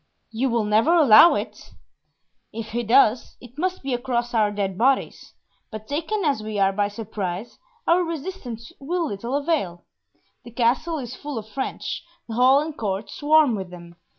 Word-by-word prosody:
"You 245 +4 0
will 235 -2 +1
never 220 +11 +3
allow 305 0 +8
it?" - - -6 0.8
"If 220 0 -6
he 240 +2 -1
does, 235 0 +3
it 245 +3 -14
must 370 -1 -2
be 270 -1 -2
across 240 -1 -2
our 215 -2 +3
dead 200 -2 -3
bodies; 260 +6 0 0.4
but 215 -1 -9
taken 330 +7 -2
as 275 -7 +1
we 215 -1 -5
are 195 -1 +3
by 205 +1 +1
surprise, 205 -1 -6 0.3
our 355 +2 +3
resistance 320 - -6
will 340 +5 -2
little 235 +1 -4
avail. 280 - -1 0.6
The - - -11
Castle 250 +8 0
is 255 -3 -6
full 290 -3 -6
of 215 -1 -6
French, 265 +5 -4 0.2
the 225 - -6
hall 255 +4 +5
and 310 0 -5
court 200 -3 -3
swarm 300 -3 +3
with 190 -4 -4
them. 170 -1 -12
240 Hz, 170 wpm, -23 LUFS, 215-290 Hz, 0.8 s, allow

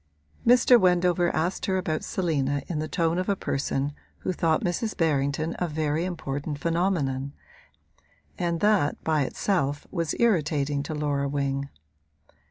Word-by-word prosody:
Mr. 245 0 +7
Wendover 180 -1 +3
asked 175 +4 -1
her 190 -1 +1
about 160 -4 -2
Selina 145 -6 -1
in 165 -4 -2
the 155 - -2
tone 165 +1 0
of 185 - -2
a 200 - +3
person 140 -3 -2 0.3
who 185 - -1
thought 160 -2 +1
Mrs. 210 +5 -2
Berrington 155 0 0
a 180 - 0
very 155 +1 -1
important 145 -4 -4
phenomenon, 145 -5 0 1.0
and 170 -1 -1
that 205 -8 +2
by 155 -2 +2
itself 145 -4 -1
was 165 -4 -1
irritating 150 -10 +1
to 150 +2 -5
Laura 145 -2 -1
Wing. 140 0 -1
160 Hz, 140 wpm, -26 LUFS, 145-180 Hz, 1.0 s, Mr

